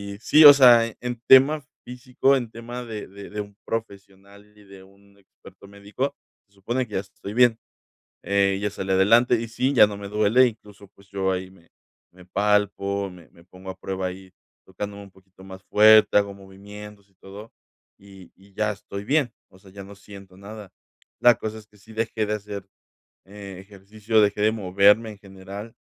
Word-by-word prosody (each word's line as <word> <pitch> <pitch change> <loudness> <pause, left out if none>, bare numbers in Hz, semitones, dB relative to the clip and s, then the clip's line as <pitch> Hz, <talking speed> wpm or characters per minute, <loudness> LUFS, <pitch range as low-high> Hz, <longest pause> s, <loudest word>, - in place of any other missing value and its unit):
y - - -13
sí, 155 +7 +4
o 145 - +12
sea, 120 -4 +6 0.2
en 120 -1 -6
tema 140 +3 +5 0.2
físico, 125 +2 -1
en 120 -3 -5
tema 120 +2 -8
de 110 -3 -8
de 100 +1 -12
de 105 0 -5
un 100 -1 -12
profesional 100 -2 -8
y 105 - -19
de 95 -1 -15
un 100 +1 -24
experto 100 0 -19
médico, 100 +8 -5 0.3
se 100 - -36
supone 120 +6 -3
que 105 - -16
ya - - -1
estoy 100 +1 -10
bien. 120 -1 +3 0.6
Eh, 100 -1 +1
ya 105 - -1
salí 95 -1 -6
adelante, 115 +6 +4
y 115 - -6
sí, 125 +4 -2
ya 105 -5 +6
no 100 - -8
me 100 0 -8
duele, 105 +5 +3
incluso, 105 -3 -12
pues, 100 0 -24
yo 95 -1 -2
ahí 95 0 -4
me 85 -3 -23 0.4
me 90 0 -18
palpo, 100 0 -1
me 90 -3 -16
me 85 - -22
pongo 90 +1 -13
a 95 - -14
prueba 95 0 -4
ahí, 95 0 -10 0.3
tocándome 100 +2 -8
un 100 - -16
poquito 95 0 -21
más 95 0 -12
fuerte, 110 +2 +5
hago 100 -1 0
movimientos 100 +1 -14
y 95 - -37
todo, 100 +4 -13 0.5
y 95 -2 -17
y 100 +1 -23
ya 105 +1 -1
estoy 100 0 -9
bien. 140 -3 0 0.2
O 95 0 -21
sea, 95 -1 -19
ya 100 0 -11
no 100 +1 -13
siento 100 -2 -15
nada. 105 0 -11 0.5
La 120 -1 +5
cosa 110 0 -6
es 105 - -18
que 105 0 -25
sí 110 +2 -17
dejé 110 0 -2
de 105 - -3
hacer, 105 -2 -7 0.6
eh, 100 -1 -11
ejercicio, 105 +3 -3
dejé 105 0 +1
de 110 +1 +3
moverme 105 +2 +2
en 105 - -12
general. 100 +3 -11
100 Hz, 190 wpm, -23 LUFS, 95-110 Hz, 0.6 s, o